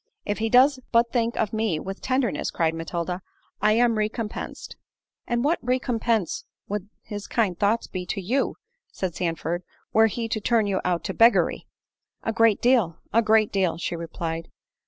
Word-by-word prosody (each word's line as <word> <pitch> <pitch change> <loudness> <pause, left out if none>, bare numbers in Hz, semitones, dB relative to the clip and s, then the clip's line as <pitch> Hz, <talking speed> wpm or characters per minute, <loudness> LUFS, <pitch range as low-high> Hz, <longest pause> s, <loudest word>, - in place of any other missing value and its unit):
"If 205 +1 -2
he 225 0 0
does 260 +3 +5
but 235 0 +3
think 235 -1 0
of 215 -1 0
me 215 -7 0
with 195 +3 -6
tenderness," 255 - 0
cried 165 -1 0
Matilda, 170 +2 -3 0.4
"I 210 +1 +4
am 230 -1 +3
recompensed." 215 0 -4 0.5
"And 240 0 0
what 315 +4 +2
recompense 235 -5 0 0.2
would 205 -1 -4
his 205 -2 -6
kind 210 -7 +1
thoughts 205 +6 +1
be 180 -1 -6
to 200 - -2
you," 235 +9 0 0.4
said 185 -3 -3
Sandford, 170 0 -2 0.3
"were 220 +1 +6
he 230 +2 -3
to 215 - -2
turn 230 -1 +2
you 195 -2 0
out 175 -2 0
to - - -3
beggary?" 230 +1 +4 0.6
"A 225 - -1
great 225 -2 +3
deal—a 230 -3 +2
great 215 -1 +3
deal," 190 -4 +1
she 170 - -3
replied. 165 0 -4
215 Hz, 165 wpm, -25 LUFS, 180-230 Hz, 0.6 s, were